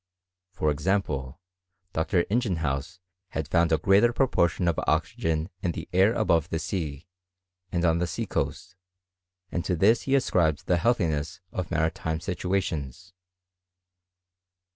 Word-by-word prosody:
For 75 -4 0
example. 75 -6 -1 0.5
Dr. 85 +2 +1
Ingenhousz 85 - -1 0.4
had 80 -2 -2
found 85 +1 +2
a 80 - +4
greater 100 +9 +4
proportion 90 - +1
of 85 - +1
oxygen 80 +2 0
in 85 - -1
the - - -6
air 95 +5 +5
above 85 -9 +2
the 80 - -1
sea, 80 -3 -4 0.7
and 85 0 0
on 80 0 +3
the 90 - 0
sea - - -3
coast; 90 0 -3 0.8
and 85 - -2
to 90 - 0
this 105 +8 +4
he 135 - +4
ascribed 85 - +1
the 90 - +2
healthiness 80 -8 0
of 90 -3 -4
maritiffie 80 0 -1
situations. 90 -3 -3
85 Hz, 130 wpm, -27 LUFS, 80-95 Hz, 0.8 s, air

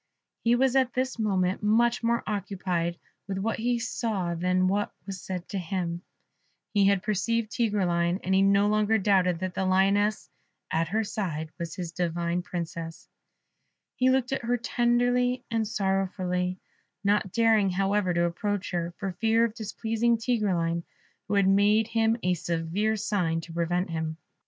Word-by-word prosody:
He 235 +1 +4
was 265 +1 +2
at 260 -2 +3
this 255 -1 -1
moment 190 -4 +1
much 230 +3 +3
more 235 0 +1
occupied 180 -4 -2 0.3
with 195 -1 -3
what 220 +4 -1
he 240 +2 +1
saw 220 -6 -2
than 180 +2 +1
with 185 - +3
what 205 +1 -1
was 195 -2 -6
said 180 -2 -5
to 195 - -2
him; 175 -1 -3 0.7
he 200 -2 +4
had 200 -2 +2
perceived 215 +2 0
Tigreline, 180 -6 +1
and 190 - 0
he 190 - +4
no 200 +1 +4
longer 215 +1 +2
doubted 185 -4 +2
that 185 -1 -2
the 190 - -1
lioness 195 +3 +2 0.4
at 165 +1 +1
her 220 +6 0
side 165 -7 -4
was 170 -1 -4
his 175 -3 -5
divine 170 0 -1
Princess; 170 -2 -6 0.9
he 255 0 +3
looked 260 -1 +1
at 270 - -1
her 245 +1 0
tenderly 245 +1 +1
and 225 -1 0
sorrowfully, 185 -3 -1 0.5
not 200 -2 +1
daring, 220 -3 +3
however, 195 +1 +1
to 170 0 +2
approach 200 +3 -2
her, 170 -1 -2
for 195 -2 -3
fear 225 +5 +2
of 230 - -3
displeasing 225 +1 0
Tigreline, 190 -8 0 0.5
who - - 0
had 200 -1 +4
made 205 +3 +4
him 225 0 +2
a 180 - +2
severe 175 +6 -1
sign 185 -6 0
to 165 0 -10
prevent 175 +1 -1
him. 160 -1 -3
195 Hz, 160 wpm, -27 LUFS, 180-225 Hz, 0.9 s, He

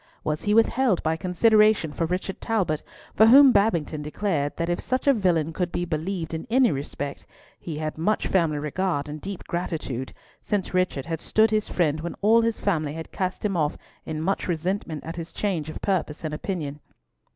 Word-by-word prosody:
Was 150 0 -1
he 210 0 +1
withheld 225 -2 +3
by 160 0 +1
consideration 210 -1 +3
for 165 - -1
Richard 185 +2 -3
Talbot, 190 -10 0 0.3
for 220 - +6
whom 270 +3 +9
Babington 170 -8 +1
declared 150 -1 -2
that 170 - -1
if 175 0 -1
such 255 +1 -2
a 280 - +6
villain 170 - +1
could 180 +1 -2
be 175 - -2
believed 165 +1 -3
in 160 - -4
any 250 0 +4
respect, 140 0 -5 0.4
he 160 -3 -6
had 155 0 -4
much 210 +7 +1
family 165 -5 +1
regard 150 0 -1
and 150 0 -7
deep 195 -1 -6
gratitude, 155 -7 -4 0.3
since 200 -3 -2
Richard 185 -7 0
had 165 -1 -4
stood 220 0 +3
his 215 -1 0
friend 155 -4 +1
when 170 - -5
all 225 +3 +5
his 230 -1 0
family 155 -7 0
had 160 0 -7
cast 185 +2 -3
him 200 -2 0
off 155 -3 0 0.3
in 155 -1 -4
much 190 +5 -1
resentment 170 -2 -2
at 165 +2 -7
his 165 0 -6
change 175 -7 -2
of - - -6
purpose 175 -6 -1
and 155 -1 -3
opinion. 150 -4 -4
175 Hz, 190 wpm, -25 LUFS, 155-200 Hz, 0.4 s, whom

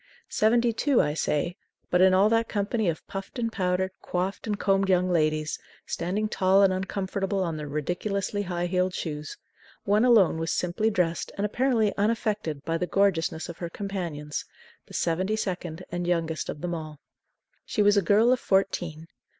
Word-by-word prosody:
Seventy 235 +2 +3
two, 270 +3 +2
I 150 - +2
say, 160 +3 -1 0.3
but 180 - +4
in 190 0 +7
all 190 +2 +5
that 225 0 +2
company 205 0 0
of 160 - -4
puffed 195 +6 -7
and 230 -2 -1
powdered, 185 -1 0
coifed 185 +4 -2
and 210 -1 -1
combed 195 -1 +2
young 180 0 +3
ladies, 155 -2 +1 0.3
standing 195 +5 -2
tall 195 -1 +3
and 190 -1 +4
uncomfortable 190 +1 -2
on 165 -3 -2
their 150 -1 -5
ridiculously 185 +7 -2
high 175 -2 -2
heeled 180 +1 0
shoes, 150 -2 -5 0.5
one 210 +3 +3
alone 215 -10 +5
was 165 0 -2
simply 180 +5 0
dressed 175 -5 -1
and 200 - 0
apparently 225 -1 +1
unaffected 210 - -1
by 165 0 -1
the 180 - -1
gorgeousness 175 -5 +1
of 170 - -9
her 170 - -4
companions, 170 -7 -4 0.4
the - - -10
seventy 185 +5 0
second 180 -5 -4
and 175 0 -3
youngest 165 -2 -1
of 150 - -5
them 175 -1 -2
all. 155 -3 -6 0.6
She 210 - 0
was 205 0 +5
a 200 - +4
girl 210 +6 +4
of 255 - 0
fourteen. 175 -5 0
185 Hz, 175 wpm, -27 LUFS, 170-205 Hz, 0.6 s, in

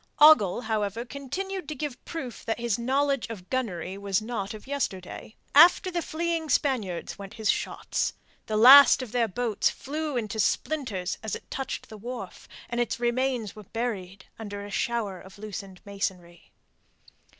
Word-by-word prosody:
Ogle, 295 -10 +7
however, 220 0 -2
continued 360 +8 -5
to 305 - -4
give 290 -2 -5
proof 265 -9 -6
that 225 - -2
his 235 -2 0
knowledge 275 +2 +1
of 195 -5 -9
gunnery 195 -7 -2
was 200 -2 0
not 215 -2 -4
of 215 - -11
yesterday. 220 -7 -4 0.2
After 350 +5 +7
the 345 -1 -1
fleeing 330 0 -2
Spaniards 225 - 0
went 200 +1 -9
his 220 -2 +2
shots. - - -2 0.3
The 215 - 0
last 260 +4 +9
of 240 - -9
their 235 -1 +2
boats 220 +1 0
flew 300 0 -4
into 220 -2 -3
splinters 205 -5 -1
as 220 - -3
it - - -12
touched 270 -1 -4
the 220 - -9
wharf, 230 -3 -7 0.2
and 240 0 -1
its 235 - -2
remains 240 -2 0
were 215 - -9
buried 195 -5 -4
under 205 -2 -6
a 205 - -9
shower 210 -4 -2
of 190 +2 -14
loosened 200 -3 -8
masonry. 180 -4 -5
230 Hz, 160 wpm, -27 LUFS, 200-270 Hz, 0.3 s, last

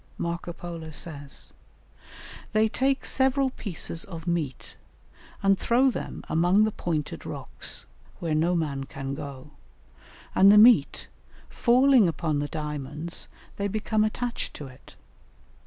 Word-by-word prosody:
Marco 170 0 -3
Polo 170 -2 -7
says: 145 -2 -7 1.0
"They 215 +1 +4
take 265 +4 0
several 265 0 +2
pieces 170 -6 -3
of 165 -4 -9
meat, 160 -7 -3 0.7
and 195 -1 +4
throw 255 +3 +3
them - - -6
among 175 +6 +3
the 215 - +2
pointed 160 -6 -3
rocks, - - -4 0.3
where 165 -2 -2
no 165 +4 +2
man 140 -5 -2
can 135 0 -6
go, 140 0 -8 0.8
and 195 +1 +7
the 210 - +7
meat, 215 - +6 0.5
falling 250 -2 +5
upon 155 -2 -1
the 145 - -1
diamonds, 150 +2 -3 0.3
they 200 - -1
become 215 +1 0
attached 235 +3 -3
to 145 - -7
it. 130 0 -15
170 Hz, 125 wpm, -26 LUFS, 150-215 Hz, 1.0 s, and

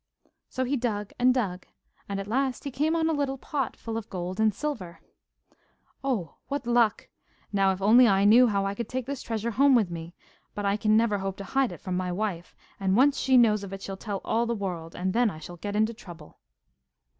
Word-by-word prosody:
So 260 - -2
he 260 +3 0
dug 210 -4 -3
and 250 +1 +5
dug, 195 -8 -2 0.4
and 200 0 -2
at 195 - -4
last 260 +4 -1
he 280 - -4
came 300 +5 0
on 325 -1 +1
a 325 - +1
little 280 -2 -1
pot 275 -1 -3
full 225 -1 -5
of 225 - -6
gold 185 +1 -5
and 220 0 +4
silver. 210 -10 -5 1.0
'Oh, 235 -11 -2
what 280 -2 -3
luck! 235 -2 +2 0.5
Now, 195 -1 +3
if 190 0 -4
only 235 +4 +7
I 195 -2 +3
knew 240 +4 +7
how 200 -3 0
I 195 - -1
could 230 +2 -5
take 255 -1 -3
this 280 0 -5
treasure 225 0 -3
home 275 +4 +5
with 210 -7 +2
me 170 0 -7 0.4
but 205 - -3
I 200 0 +2
can 215 0 +3
never 220 -3 +2
hope 195 0 -4
to 200 - -6
hide 265 +5 0
it - - -10
from 185 -1 -3
my 180 0 -1
wife, 180 -2 -3 0.2
and 195 0 +1
once 280 +3 +4
she 260 -1 +4
knows 215 -4 +4
of 195 -1 -7
it 195 - -7
she'll 195 - -5
tell 200 0 -5
all 230 +2 +1
the 235 - -1
world, 175 -5 -5
and 185 +1 -2
then 240 -1 +3
I 160 - -8
shall 175 +3 -10
get 205 +4 -5
into 220 +2 +2
trouble. 175 -9 -13
215 Hz, 225 wpm, -27 LUFS, 195-250 Hz, 1.0 s, only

